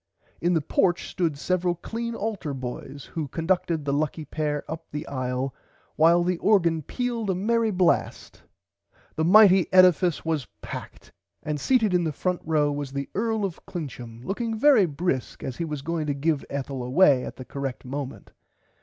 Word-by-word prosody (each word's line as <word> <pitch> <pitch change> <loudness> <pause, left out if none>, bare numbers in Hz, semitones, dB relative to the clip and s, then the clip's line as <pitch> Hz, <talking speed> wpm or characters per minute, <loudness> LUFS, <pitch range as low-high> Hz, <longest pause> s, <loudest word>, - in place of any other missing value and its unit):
In 175 +1 +2
the 160 - +2
porch 175 +4 +1
stood 165 -5 -1
several 180 +3 0
clean 230 +6 -5
altar 200 -11 -3
boys 135 +2 -7
who 160 -4 -2
conducted 165 0 -1
the 140 - 0
lucky 155 +2 -1
pair 150 0 -2
up 165 +1 -7
the 150 +2 -5
aile 130 0 -2 0.4
while 170 +2 +5
the 180 -1 0
organ 170 -6 +3
pealed 235 - -3
a 190 - +1
merry 225 +4 +1
blast 185 -4 0 0.7
The 160 - 0
mighty 190 0 +6
edifice 180 -3 +5
was 160 -5 -1 0.2
packed - - -8 0.3
and 150 -1 -2
seated 225 - +2
in 180 -1 +3
the 160 - 0
front 180 +5 -2
row 150 -2 +2
was 145 -1 -4
the 140 0 -4
Earl 220 0 0
of 185 -4 -6
Clincham 125 -8 -7
looking 225 +3 -2
very 240 -6 +5
brisk 145 -3 -3
as 130 - -5
he 170 - -2
was 150 -3 -5
going 165 -1 -2
to 145 - 0
give 145 0 0
Ethel 135 -1 -4
away 130 +1 +4
at - - -6
the 130 - -9
correct 135 0 -5
moment. 135 +1 -6
165 Hz, 170 wpm, -25 LUFS, 140-185 Hz, 0.7 s, mighty